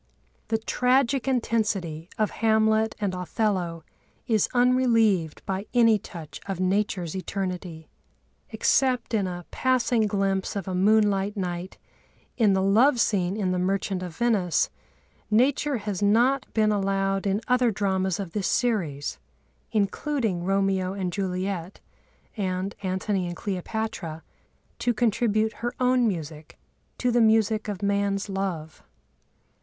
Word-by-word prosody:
The 225 - +1
tragic 250 +3 +1
intensity 210 -10 -1
of 215 -1 +1
Hamlet 220 0 +3
and 200 -3 -1
Othello 180 -2 -2 0.4
is 220 -4 +2
unrelieved 230 -9 +2
by 195 +1 -3
any 230 -3 +5
touch 165 -5 -10
of 195 -3 -3
Nature's 185 -2 0
eternity. 180 -4 -4 0.6
Except 255 -3 +1
in 205 -4 +1
a 175 -1 -6
passing 245 -3 +2
glimpse 195 -1 -1
of 195 -2 -4
a 190 - -2
moonlight 205 +1 +2
night 180 -1 -4 0.6
in 215 -5 +3
the 190 0 +1
love 235 +7 +4
scene 195 -3 +1
in 190 -4 0
the 180 - 0
Merchant 190 0 -1
of 180 -3 -6
Venice, 210 -8 +1 0.6
Nature 260 +5 +2
has 205 -3 -4
not 240 +6 +2
been 215 -1 +2
allowed 195 -1 0
in 195 +1 +1
other 250 -1 +3
dramas 190 -3 0
of 190 -4 -5
this 200 0 -1
series, 170 - -1 0.5
including 215 - -1
Romeo 195 0 +1
and 185 -3 -3
Juliet 185 -2 -3 0.6
and 190 -2 -2
Antony 190 0 -1
and 175 - -5
Cleopatra, 185 -4 -4 0.6
to 240 - +1
contribute 220 -1 +1
her 240 +1 -2
own 250 -1 +3
music 155 -5 -5 0.4
to 250 - +1
the 240 0 +3
music 220 -1 +3
of 205 -1 -5
man's 200 0 0
love. 185 -5 -4
200 Hz, 130 wpm, -26 LUFS, 185-225 Hz, 0.6 s, any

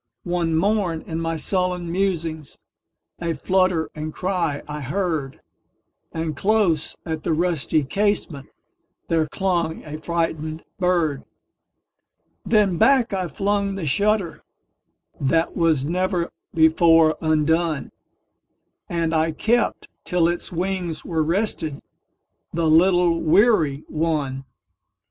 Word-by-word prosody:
One 175 -2 0
morn, 185 -2 +1
in 165 0 -4
my 165 0 -1
sullen 180 0 -1
musings,A 170 -2 -4
flutter 185 +1 +1
and 155 0 -5
cry 175 -5 -2
I 150 0 -5
heard; 150 -2 -2 0.7
And 160 -2 -3
close 190 -3 +1
at 160 -2 -3
the 165 - 0
rusty 160 -4 +1
casementThere 165 -2 -3
clung 175 -2 -1
a 155 0 -7
frightened 160 -1 -2 0.2
bird. 170 -6 +1 1.2
Then 200 -6 +2
back 265 -6 +4
I 185 -2 -1
flung 200 +4 -1
the 190 -4 -4
shutterThat 165 -3 -2
was 160 -6 +2
never 180 +1 -1 0.2
before 160 0 +5
undone, 160 0 +1 1.0
And 165 -1 -1
I 160 0 +2
kept 230 +9 0 0.2
till 175 -3 +2
its 175 0 -2
wings 175 -2 -3
were 160 -3 0
restedThe 165 -4 -1 0.8
little 170 +1 +3
weary 160 - +3
one. 150 -4 -2
165 Hz, 100 wpm, -22 LUFS, 155-185 Hz, 1.2 s, before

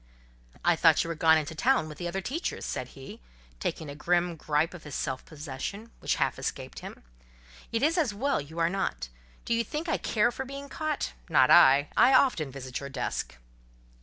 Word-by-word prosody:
"I 175 0 +5
thought 160 -1 +5
you 165 - -6
were - - -1
gone 160 0 +5
into 155 +1 -3
town 245 - +2
with 150 - -10
the 175 - -3
other 190 +3 -3
teachers," 285 - -3
said - - -5
he, 135 - -10 0.4
taking 160 - -3
a 140 - -6
grim 175 +3 0
gripe 155 +2 0
of 175 - -10
his 150 -3 -7
self 130 - -3
possession, 155 - -7
which - - 0
half - - 0
escaped - - -5
him—"It - - -9
is 330 +4 +3
as 290 -9 +1
well 255 - 0
you 155 +4 -11
are 165 0 +3
not. 170 - -2 0.4
Do - - 0
you 230 0 +2
think 300 +9 -5
I 320 - +1
care 215 +1 +2
for 265 - -5
being 275 +1 -8
caught? 310 -1 -3 0.2
Not 130 -5 +5
I. 140 +2 +7
I 260 +1 +6
often 170 - +3
visit 130 -1 -6
your 140 - -7
desk." 135 -2 -4
165 Hz, 195 wpm, -28 LUFS, 140-230 Hz, 0.4 s, I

